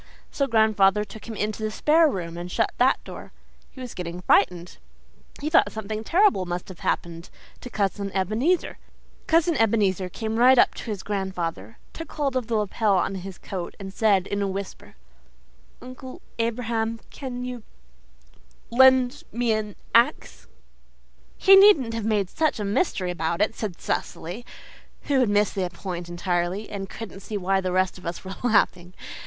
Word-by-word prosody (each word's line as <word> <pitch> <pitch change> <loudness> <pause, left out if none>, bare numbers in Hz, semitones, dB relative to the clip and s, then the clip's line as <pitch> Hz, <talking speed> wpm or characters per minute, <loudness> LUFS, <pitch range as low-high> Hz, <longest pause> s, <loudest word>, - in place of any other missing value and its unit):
So 275 - 0
grandfather 210 -3 +3
took 215 +2 -12
him 225 - -6
into 215 +1 -3
the 215 - -1
spare 310 +8 +3
room 170 -8 -5
and 175 +1 -6
shut 225 - +1
that 255 +2 +3
door. - - -10 0.4
He - - -15
was 250 -2 -7
getting 175 0 -6
frightened. 180 -1 +1 0.6
He 290 - -4
thought 320 +2 +4
something 215 0 -5
terrible 340 - +3
must 175 +1 -4
have 185 - -11
happened 170 0 -3 0.4
Cousin 200 -1 -1
Ebenezer. 220 - 0 0.5
Cousin 330 +1 +3
Ebenezer 200 -5 +1
came 220 +4 -4
right 255 +2 +6
up - - +5
to 220 -3 -5
grandfather, 180 - -4 0.2
took 330 -1 -8
hold 280 -3 -1
of 250 -4 -1
the 235 - -1
lapel 210 -1 +1
of 185 - 0
his 185 0 -8
coat, 180 -3 -6
and 195 -1 -8
said 200 -3 +2
in 200 0 -3
a 200 - 0
whisper, 195 0 -7 0.9
'Uncle 255 +1 -10 0.2
Abraham, 230 -1 -1
CAN 250 -2 -6
YOU 250 -1 -6 1.1
LEND 260 +2 +5
ME 235 +1 0
AN 215 -2 -2 0.2
AXE?'" 235 +1 +2 0.9
"He 390 - +7
needn't 385 - +6
have 225 -2 -3
made 210 -3 +1
such 310 -6 0
a 210 - -2
mystery 200 - 0
about 170 0 -2
it," 210 +2 +2
said 205 -7 -5
Cecily, 195 +9 -4 0.6
who 280 -2 +1
had 250 -4 +3
missed 205 0 +2
the 185 -2 -2
point 175 -1 -6
entirely, 175 +3 -2
and 195 -2 -5
couldn't 210 -4 -8
see 210 +2 -5
why 190 0 +1
the 185 -1 -2
rest 185 0 0
of 180 - -9
us 170 +2 -5
were 190 - -5
laughing. 185 -6 +1
210 Hz, 165 wpm, -24 LUFS, 185-240 Hz, 1.1 s, He